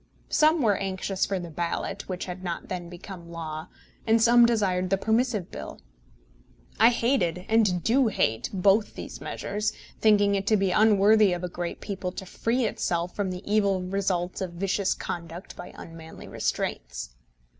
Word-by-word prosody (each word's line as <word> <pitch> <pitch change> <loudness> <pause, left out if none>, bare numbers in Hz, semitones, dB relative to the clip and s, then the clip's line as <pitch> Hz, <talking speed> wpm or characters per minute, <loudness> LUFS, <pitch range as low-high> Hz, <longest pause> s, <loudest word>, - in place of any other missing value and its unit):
Some 310 -1 +4
were 210 -3 +3
anxious 190 0 -2
for 195 -2 -1
the 170 -2 -7
Ballot, 170 +4 -3
which 185 -1 -3
had 185 0 -7
not 175 -2 -4
then 175 -2 -5
become 175 -1 -10
law, 160 -2 -6 0.4
and 225 +1 +5
some 235 +1 +6
desired 190 -6 +1
the 195 - +2
Permissive 220 -2 0
Bill. - - -8 1.0
I 225 - +8
hated, 195 -8 0
and 205 -6 +2
do 250 +2 +3
hate, 115 - 0
both 200 +2 +2
these - - -8
measures, 210 +1 -3 0.3
thinking 205 -2 +4
it 195 0 -1
to 215 - +4
be 195 -1 +1
unworthy 210 -1 +5
of 175 0 -4
a - - -1
great 175 0 -5
people 190 -3 -4
to 190 - -7
free 235 +6 -1
itself 175 -4 -2
from 200 -2 -1
the 180 +1 -6
evil 200 -2 +2
results 185 -1 -1
of 180 -2 -3
vicious 195 +2 0
conduct 170 +1 -6
by - - -9
unmanly 165 -1 -10
restraints. - - -3
190 Hz, 165 wpm, -26 LUFS, 175-215 Hz, 1.0 s, I